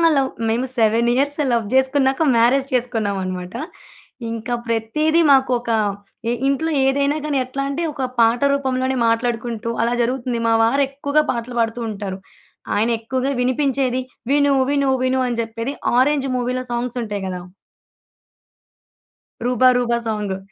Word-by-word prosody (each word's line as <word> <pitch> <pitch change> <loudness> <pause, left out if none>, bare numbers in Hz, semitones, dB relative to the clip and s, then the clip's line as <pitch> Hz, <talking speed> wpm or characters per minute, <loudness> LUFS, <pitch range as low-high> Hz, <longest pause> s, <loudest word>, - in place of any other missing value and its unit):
Love 270 -1 +2 0.2
మేము 230 +3 0
7 230 +1 +3
years 285 +3 +1
love 230 -3 +1
జేసుకున్నాక 265 +2 +2
marriage 250 +4 +3
చేసుకున్నామనమాట. 200 -7 -2 0.8
ఇంకా 230 +2 -4
ప్రతీదీ 300 +9 +1
మాకొక 255 -3 +2 0.6
ఇ - - +1 0.2
ఇంట్లో 310 +4 0
ఏదైనా 280 +2 +1
గాని 295 -2 0
ఎట్లా 265 +2 -4
అంటే 295 +5 -2
ఒక 270 -2 -2
పాట 230 +1 +4
రూపంలోనే 260 -1 0
మాట్లాడుకుంటూ 230 0 -1
అలా 235 +1 +1
జరుగుతుంది. 245 0 -1
మా 225 - +3
వారెక్కువగా 280 +4 +1
పాటలు 240 0 -5
పాడుతూ 230 +1 0
ఉంటారు. 195 -2 -5 0.6
ఆయనెక్కువగా 235 +4 0
వినిపించేది 260 0 +1 0.3
విను 285 0 +3 0.2
విను 280 -1 +1
విను 260 0 +1
అని 240 -1 -2
చెప్పేది 230 +4 -4 0.2
'ఆరెంజ్' 275 +1 +2
మూవీలో 250 +1 -1
సాంగ్సుటాయి 235 -4 -3
గదా! 180 -1 -4 2.0
'రూబ 250 0 0
రూబా' 240 -1 +1
సాంగు. 210 -3 -2
245 Hz, 125 wpm, -20 LUFS, 230-270 Hz, 2.0 s, పాట